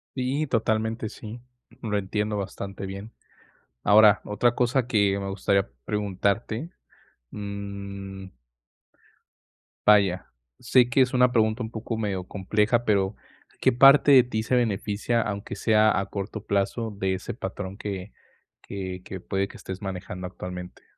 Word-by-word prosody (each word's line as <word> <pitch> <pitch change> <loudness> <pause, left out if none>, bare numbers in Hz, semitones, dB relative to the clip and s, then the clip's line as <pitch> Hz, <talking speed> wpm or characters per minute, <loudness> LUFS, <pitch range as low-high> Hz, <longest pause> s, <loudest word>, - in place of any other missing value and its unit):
Sí, 135 +4 -1
totalmente 110 -2 0
sí, 110 +3 -9 0.4
lo 110 -4 -2
entiendo 105 +2 -1
bastante 100 0 -5
bien, 100 +3 -8 0.7
ahora, 105 0 +6
otra 115 +4 +1
cosa 125 0 +1
que 100 -4 +2
me 100 0 -4
gustaría 100 0 +1 0.2
preguntarte, 105 - -1 0.6
mm 100 -1 -6 1.6
vaya, 100 -4 +4 0.3
sé 125 0 +4
que 135 +2 +2
es 130 0 +4
una 125 -1 +4
pregunta 110 0 +2
un 110 - -5
poco 115 0 -4
medio 100 -4 -2
compleja 105 +5 0
pero, 100 -2 +1 0.4
¿qué 130 - +4
parte 140 +3 +7
de 130 - +9
ti 115 -3 -3
se 130 - 0
beneficia, 110 0 0
aunque 100 -1 -4
sea 110 +1 +3
a 100 - -1
corto 100 +1 -6
plazo, 100 +3 0
de 95 -1 0
ese 95 - -5
patrón 95 -2 -6
que 100 -1 -5 0.5
que 95 -2 -6
que 95 - -6
puede 95 +2 -2
que - - -12
estés 95 +1 -7
manejando 90 -1 -5
actualmente? 90 -1 -8
105 Hz, 135 wpm, -26 LUFS, 95-115 Hz, 1.6 s, de